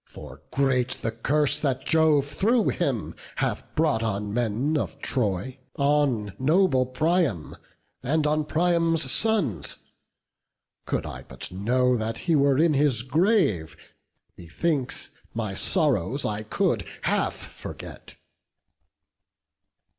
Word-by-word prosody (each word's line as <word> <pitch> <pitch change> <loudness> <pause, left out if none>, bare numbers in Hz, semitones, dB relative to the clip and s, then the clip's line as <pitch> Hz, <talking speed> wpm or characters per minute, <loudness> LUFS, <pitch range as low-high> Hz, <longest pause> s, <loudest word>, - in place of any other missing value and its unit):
for - - -11
great 130 -2 +1
the 115 - 0
curse 145 +6 +1
That 135 -2 -1
Jove 160 -3 +4
thro' 210 - +1
him 135 - -1 0.2
hath - - -1
brought 155 -7 +2
on 105 -2 -2
men 120 +6 0
of 140 -1 -2
Troy, 125 -1 -2 0.2
On 140 - +1
noble 145 -2 +3
Priam, 145 - 0 0.5
and 150 +4 0
on 150 0 +1
Priam's 165 -3 +1
sons. 150 - 0 1.1
Could - - -1
I - - -7
but - - -6
know 125 +7 +2
that 110 0 -2
he 170 -2 +3
were 140 -2 +3
in 160 +1 +4
his 135 -5 +2
grave, 150 - +1 0.6
Methinks 130 - -2 0.2
my 110 -4 -2
sorrows 135 - +1
I 105 0 -2
could 110 - 0 0.2
half - - +1
forget." - - -10
135 Hz, 115 wpm, -25 LUFS, 115-155 Hz, 1.1 s, Jove